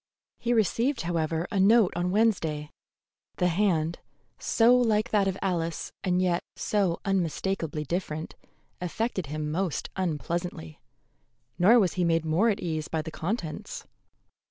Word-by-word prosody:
He 240 - -1
received, 235 +4 +1
however, 165 -1 -1
a 200 - 0
note 210 0 +5
on 175 +1 0
Wednesday. 170 -8 +1 0.6
The 180 - +2
hand, 170 -3 +1 0.4
so 235 +2 +4
like 225 -3 +2
that 205 -2 +3
of 190 0 -1
Alice 170 -3 -2
and 180 -1 +1
yet 180 -2 +1
so 195 -5 0
unmistakably 175 -4 -1
different, 160 0 -3 0.5
affected 190 -1 -2
him 150 +1 -3
most 175 0 -2
unpleasantly, 170 - -3 0.8
nor 210 +7 +7
was 190 -8 +3
he 180 - 0
made 165 -1 +2
more 170 +9 +3
at 210 - -1
ease 155 -3 -2
by 160 -1 -2
the 160 - -6
contents. 170 -2 -4
180 Hz, 135 wpm, -27 LUFS, 160-205 Hz, 0.8 s, nor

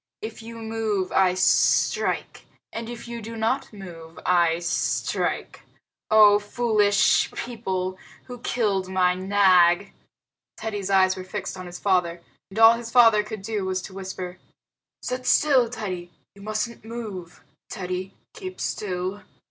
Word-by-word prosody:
If 440 - -6
you 230 +1 -9
move 220 -4 -2
I 185 -1 +3
strike, 185 0 +1 0.3
and 230 0 -5
if 240 0 -8
you 235 0 -6
do 225 +2 -7
not 225 +5 -1
move 170 -6 -11
I 170 -2 +3
strike. 170 0 -2 0.5
Oh, 210 -1 +7
foolish 210 -1 +2
people, 190 -6 -4 0.2
who 245 -1 -9
killed 200 -6 -1
my 185 -1 +2
Nag!" 185 -1 +3 0.6
Teddy's 205 -3 -4
eyes 190 -1 +4
were 185 - -7
fixed 195 +2 -5
on 185 -1 -8
his 175 0 -8
father, 180 -3 +1 0.3
and 195 - -11
all 225 0 +8
his 235 -1 -7
father 230 -3 +6
could 210 -1 -8
do 210 -1 -2
was 190 0 -1
to - - -9
whisper, 185 -1 -7 0.6
"Sit 255 0 -4
still, 265 -6 +4
Teddy. 185 -7 -5 0.2
You 200 - -16
mustn't 215 +3 -3
move. 215 -7 -8 0.3
Teddy, 185 -1 -5 0.2
keep 375 -5 -8
still." 185 0 -3
200 Hz, 140 wpm, -24 LUFS, 185-225 Hz, 0.6 s, all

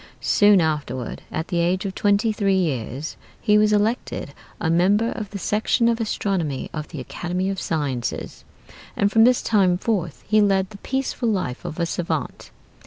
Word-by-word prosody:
Soon 205 -2 +5
afterward 145 -6 -2
(at 160 - -3
the 175 -2 0
age 180 +3 +1
of 195 - -3
twenty 205 +2 +2
three 195 -2 +1
years) 140 - -2 0.2
he 210 -2 +3
was 210 0 +3
elected 210 +4 0 0.3
a - - -1
member 195 +7 +3
of 215 -3 -5
the 200 - -6
section 215 +4 +1
of 230 0 +1
Astronomy 185 -10 -2
of 155 -1 -4
the 155 - -8
Academy 180 +8 -3
of 195 - -4
Sciences, 140 -7 -3 0.5
and 200 0 +2
from 225 0 +6
this 250 0 +3
time 190 -5 +3
forth 175 - -2
he 215 0 +4
led 195 -1 +2
the 200 - -11
peaceful 265 -2 -2
life 185 - -2
of 155 - -5
a 170 - +2
savant. 170 +1 -3
190 Hz, 175 wpm, -23 LUFS, 160-210 Hz, 0.5 s, from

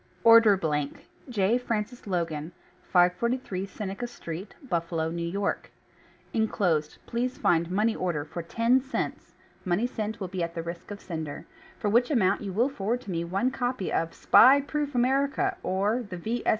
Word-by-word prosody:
ORDER 230 -3 +8
BLANK 150 -5 -2 0.2
J. 220 +1 +2
FRANCIS 230 -1 -3
LOGAN, 165 -4 -2 0.4
543 190 +2 +1
Seneca 200 +4 -5
Street, 175 -4 -8
Buffalo, 165 -4 -1
N. 170 0 -3
Y.: 200 - +2 0.8
Inclosed 180 -9 0
please 250 +2 -2
find 170 0 +2
Money 210 +4 +1
Order 165 -5 -2
for 165 +3 -6
TEN 230 +9 +2
CENTS 270 +2 -4 0.3
(money 185 +5 +1
sent 220 -3 -3
will 190 - -3
be 185 0 -4
at 170 0 -3
the 165 - -3
risk 170 +1 -7
of 205 -1 -6
sender), 160 -4 -6 0.3
for 210 - -2
which 240 +3 +4
amount 200 -9 +2
you 200 -2 -4
will 230 +7 +2
forward 240 -2 -2
to 205 - -7
me 170 -1 -1
One 195 +9 0
Copy 245 -7 -2
of 165 0 -1
"SPY 270 +3 +7
PROOF 290 0 -3
AMERICA, 280 +9 +1
or 205 - 0
the 200 -6 -7
V. 225 +7 -3
200 Hz, 165 wpm, -27 LUFS, 170-240 Hz, 0.8 s, ORDER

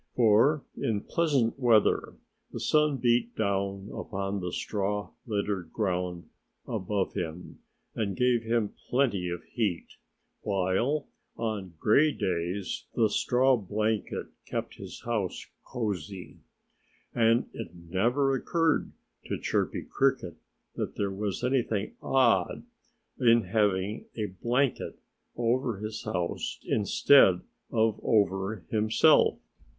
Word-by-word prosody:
For 125 +6 +4
in 105 -3 -1
pleasant 140 -7 +1
weather 115 -5 +3 0.4
the - - -5
sun 150 -2 +2
beat 120 -1 +1
down 100 -1 -1
upon 100 0 -3
the 90 -1 -4
straw 105 0 -2 0.2
littered 100 -5 -2
ground 90 -4 -2 0.4
above 95 +1 -1
him 85 +1 -5 0.3
and 100 -3 -2
gave 125 -2 +3
him 115 -2 0 0.2
plenty 115 -9 +1
of 85 0 -5
heat, 100 -8 -3 0.4
while 100 +10 0 0.3
on 105 -6 -3
gray 145 - +4
days 90 - -2
the 110 -2 +3
straw 130 +4 +3
blanket 105 0 -2 0.2
kept - - -4
his - - -9
house 110 -6 -2 0.2
cosy. 100 -5 -5 0.7
And 115 0 +3
it - - -6
never 115 +12 +1
occurred 165 +4 +1 0.3
to - - -2
Chirpy - - -1
Cricket - - 0 0.4
that - - -3
there 100 -1 -1
was 100 +2 -3
anything 120 -5 0
odd 120 -9 +2 0.6
in 115 -3 +5
having 100 +1 0
a 110 - -1
blanket 120 +8 -1 0.4
over 120 -1 0
his 110 +1 -5
house 90 -6 -2
instead 100 -2 +5 0.3
of 110 -1 +2
over 100 -2 +1
himself. 110 0 +4
105 Hz, 110 wpm, -28 LUFS, 95-120 Hz, 0.7 s, in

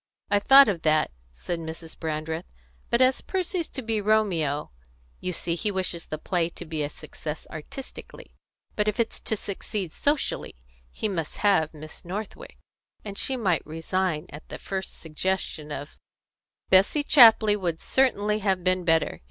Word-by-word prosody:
"I 205 - +5
thought 270 +6 +8
of 180 -5 -1
that," 155 -1 +2 0.2
said 165 - -4
Mrs. 160 0 -7
Brandreth; 160 +2 -4 0.3
"but 235 +2 +4
as 255 0 +3
Percy's 365 -2 -2
to 265 - -6
be 220 -2 -1
Romeo 185 -9 +1 0.5
You 185 - -2
see 170 0 -1
he 175 +5 -1
wishes 185 -3 -1
the 155 - -4
play 170 +1 0
to 175 - -9
be 155 -1 -3
a 145 - -1
success 155 0 -7
artistically; 160 - -9 0.4
but 210 0 0
if 210 - 0
it's 230 - 0
to 220 - 0
succeed 200 -3 -4
socially, 290 - -1 0.3
he 215 - -3
must 165 -7 -3
have 175 -7 +4
Miss 155 +1 -10
Northwick, 195 +5 -7 0.5
and 200 -1 -6
she 265 +5 0
might 185 - +1
resign 165 0 -2
at 150 +2 -11
the - - -6
first 190 -1 -5
suggestion 160 -1 -3
of 145 0 -7 0.3
" - - -56
"Bessie 195 +10 +5
Chapley 225 -7 +7
would 175 -5 -2
certainly 210 -5 +1
have 190 -3 0
been 185 0 +2
better. 165 -2 +2
185 Hz, 160 wpm, -26 LUFS, 160-215 Hz, 0.5 s, thought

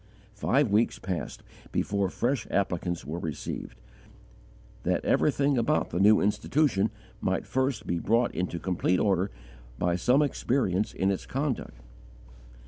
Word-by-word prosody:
Five 120 +4 +1
weeks 110 +3 +2
passed 95 -3 -5 0.3
before 100 -2 0
fresh 120 +3 -1
applicants 90 -3 -1
were 80 +3 -4
received, 80 -4 -5 1.0
that - - 0
everything 140 -2 +2
about 150 +6 +1
the 85 - -1
new 105 +2 +6
institution 110 0 +2 0.3
might - - -1
first 130 -5 -1
be 85 - -1
brought 115 +6 +2
into 90 -1 -2
complete 90 0 0
order 95 -1 +2 0.5
by 85 +3 +1
some 125 +11 +3
experience 120 -8 0
in 95 +1 +1
its 95 - -4
conduct. 130 - -3
105 Hz, 130 wpm, -28 LUFS, 90-130 Hz, 1.0 s, new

